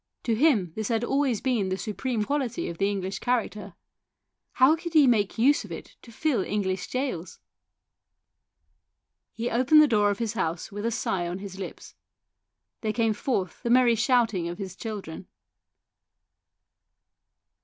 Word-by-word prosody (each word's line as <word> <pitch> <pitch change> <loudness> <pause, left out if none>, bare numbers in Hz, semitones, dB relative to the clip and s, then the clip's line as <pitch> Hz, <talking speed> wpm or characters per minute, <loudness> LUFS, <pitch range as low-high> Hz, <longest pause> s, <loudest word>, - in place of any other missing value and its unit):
To 230 - 0
him 220 - +2
this 215 +1 -3
had 230 0 0
always 270 -3 +1
been 235 -8 0
the 185 - -1
supreme 220 +2 -2
quality 265 -2 -2
of 170 - -7
the 195 0 +2
English 195 -1 -3
character; 215 -5 -2 0.8
how 265 +5 +5
could 335 +1 -7
he 305 -3 +7
make 215 -6 +2
use 275 +6 +4
of - - -11
it - - -9
to 235 - -14
fill 245 -4 0
English 190 -2 -2
gaols? 255 -10 -3 1.9
He 235 +1 -3
opened 260 +6 +5
the 305 - +7
door 210 -5 +3
of 200 - -1
his 230 -1 -2
house, 170 -3 -3
with 205 +2 -3
a - - +2
sigh 190 -5 -1
on 175 +1 -4
his 195 -1 -8
lips. 190 - -8 0.9
There 215 -1 -1
came 225 -1 +1
forth 205 -4 -2
the 235 - -3
merry 245 -1 +5
shouting 225 -6 +2
of 175 - -6
his 190 -3 -6
children. 195 -6 -7
220 Hz, 155 wpm, -26 LUFS, 195-250 Hz, 1.9 s, he